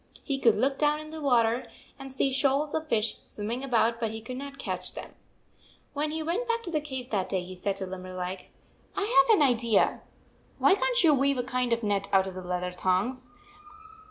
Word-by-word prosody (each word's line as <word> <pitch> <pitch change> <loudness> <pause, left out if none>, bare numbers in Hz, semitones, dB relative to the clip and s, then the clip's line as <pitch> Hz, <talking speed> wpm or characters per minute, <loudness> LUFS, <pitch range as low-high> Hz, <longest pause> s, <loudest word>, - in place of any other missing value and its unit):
He 275 -2 -2
could 230 -4 +4
look 270 +5 0
down 300 0 +2
into 310 +1 -8
the - - -7
water 240 -3 +2 0.3
and 270 0 -8
see 265 +1 +1
shoals 275 +2 +1
of 315 0 -2
fish 220 -2 +1
swimming 225 +5 -5
about, 230 -3 +2
but 225 -2 -1
he 220 +1 -6
could 250 +3 -7
not 280 0 -7
catch - - -3
them. - - -8 0.8
When 300 +1 -1
he 315 +1 -3
went 365 +10 -1
back 465 0 0
to 345 - -5
the 305 -2 0
cave 260 -4 -6
that 195 -4 -1
day, 185 -2 -1
he 185 +1 -9
said 195 +2 -2
to 195 - -5
Limberleg: 185 0 -6 0.5
"I 400 -2 +4
have 440 - +7
an 290 - +6
idea. 235 -4 +2 0.6
Why - - +5
can - - +1
t 425 -9 +5
you 305 - +6
weave 275 0 +2
a 245 - 0
kind 250 -1 -1
of 230 0 +1
net 200 -1 0
out 190 -1 +4
of 190 -1 -7
leather 180 0 -3
thongs? 195 +8 -1
250 Hz, 215 wpm, -28 LUFS, 205-295 Hz, 0.8 s, have